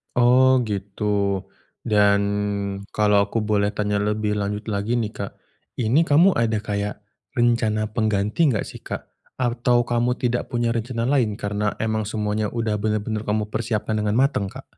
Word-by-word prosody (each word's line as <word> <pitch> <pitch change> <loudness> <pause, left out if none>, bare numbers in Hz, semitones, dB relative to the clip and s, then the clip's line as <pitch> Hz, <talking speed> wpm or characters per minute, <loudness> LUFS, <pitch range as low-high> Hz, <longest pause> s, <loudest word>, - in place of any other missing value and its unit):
Oh 125 +1 +5
gitu. 100 -1 -1 0.4
Dan 105 -1 +4 0.7
kalau 105 -1 +3
aku 110 +1 -1
boleh 105 -1 +1
tanya 105 -1 0
lebih 105 0 0
lanjut 105 +1 -2
lagi 105 +4 -1
nih 110 -3 -1
Kak, 100 - -6 0.5
ini 130 +8 +2
kamu 170 +7 +6
ada 115 -1 +1
kayak 105 0 -3 0.3
rencana 115 -3 +1
pengganti 110 +6 +1
nggak 115 -7 +1
sih - - -9
Kak? - - -7 0.2
Atau 120 0 +1
kamu 120 +1 0
tidak 125 -1 -1
punya 120 -1 0
rencana 115 0 -2
lain 120 -5 +1
karena 105 +1 -2
emang 110 -1 -1
semuanya 105 0 -1
udah 110 -2 -2
bener-bener 110 +1 -2
kamu 105 0 -1
persiapkan 110 -1 -1
dengan 105 0 0
mateng 130 -5 +2
Kak? 135 +7 -12
110 Hz, 150 wpm, -23 LUFS, 105-120 Hz, 0.7 s, kamu